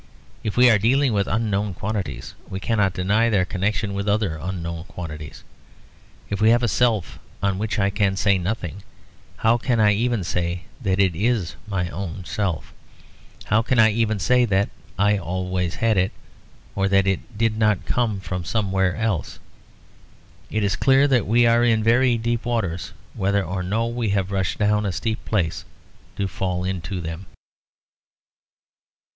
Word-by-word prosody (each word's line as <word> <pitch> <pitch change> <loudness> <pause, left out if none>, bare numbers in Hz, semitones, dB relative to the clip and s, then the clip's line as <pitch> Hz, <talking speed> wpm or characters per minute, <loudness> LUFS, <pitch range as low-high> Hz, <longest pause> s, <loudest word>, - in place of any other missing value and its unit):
If 105 - -3
we 125 0 +7
are 110 -4 +5
dealing 130 +4 +3
with 100 -2 +1
unknown 105 -2 -1
quantities, 95 - -4 0.2
we 95 - -4
cannot 100 -3 +1
deny 105 +5 +2
their 100 -5 +2
connection 100 +2 -1
with 100 +1 -2
other 100 -5 +1
unknown 85 -2 -5
quantities. 75 -6 -8 0.8
If 100 0 -3
I 110 - +5
have 120 +2 +4
a - - +3
self 110 -4 +1 0.2
of 100 -1 +1
which 110 +1 -2
I 100 -1 +2
can 100 -2 +1
say 95 0 +2
nothing, 95 0 -4 0.6
how 115 +2 +3
can 120 -1 0
I 105 -1 +5
even 115 -1 0
say 85 +1 -2 0.2
that 95 -4 0
it 95 -4 +3
is 105 -2 0
my 95 -4 -1
own 90 0 -6
self? 95 -5 -3 0.7
How 105 +1 +2
can 125 +2 0
I 110 -1 +6
even 110 -1 0
say 125 +6 +3
that 100 -2 +1 0.3
I 100 +1 +3
always 90 0 -2
had 115 -2 +1
it, 95 - +1 0.6
or 100 0 +1
that 95 0 +3
it 100 +3 -2
did 115 0 +1
not 105 -3 +2
come 115 -5 0
from 90 -1 -4
somewhere 95 -2 0
else? 110 -7 -2 1.1
It 110 -1 -1
is 100 -2 +1
clear 135 +1 +4
that 125 -5 +2
we 120 +3 +4
are 115 +1 +4
in 115 -2 +3
very 120 +2 +4
deep 120 +1 -1
waters, 105 -9 -2 0.2
whether 100 +1 +1
or 95 0 -3
no 105 +6 0
we 115 -1 -2
have 100 -1 0
rushed 95 -1 -1
down 105 0 +2
a 100 - -1
steep 110 +5 -3
place 90 -7 -1 0.5
to 100 - -1
fall 90 -1 -2
into 90 -1 -3
them. 80 +3 -6
100 Hz, 165 wpm, -23 LUFS, 95-115 Hz, 1.1 s, we